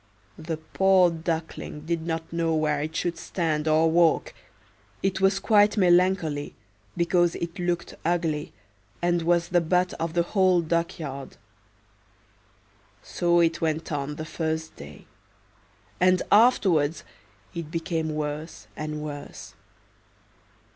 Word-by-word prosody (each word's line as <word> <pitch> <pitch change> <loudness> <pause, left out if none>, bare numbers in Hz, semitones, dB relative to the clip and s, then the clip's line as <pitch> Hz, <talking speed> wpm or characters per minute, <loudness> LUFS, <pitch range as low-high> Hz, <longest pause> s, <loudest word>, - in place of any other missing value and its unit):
The 160 0 -4
poor 185 +2 +3
Duckling 160 -2 -4
did 165 +1 -3
not 165 0 -4
know 165 -1 0
where 150 -2 0
it 155 +2 -5
should 170 -1 -2
stand 160 -4 -2
or 160 +1 +3
walk; 170 -1 +3 0.7
it 190 0 0
was 195 0 +3
quite 210 0 +4
melancholy 175 -5 +2 0.4
because 175 0 +2
it 170 +2 -5
looked 175 -1 -2
ugly, 165 -3 -1 0.5
and 175 0 +1
was 170 +1 +1
the 175 -1 +3
butt 180 +2 +1
of 165 0 -3
the 170 - +3
whole 185 -1 +3
duck 170 +1 -1
yard. 140 -4 -7 1.7
So 175 0 +2
it 165 0 +1
went 160 0 -1
on 145 0 -3
the 155 - -6
first 160 0 -3
day; 70 0 -12 0.9
and 185 0 +3
afterwards 185 - +4 0.5
it 170 -3 -6
became 160 -2 -2
worse 150 +1 -5
and 150 0 -5
worse. 145 -1 -8
165 Hz, 125 wpm, -25 LUFS, 155-175 Hz, 1.7 s, quite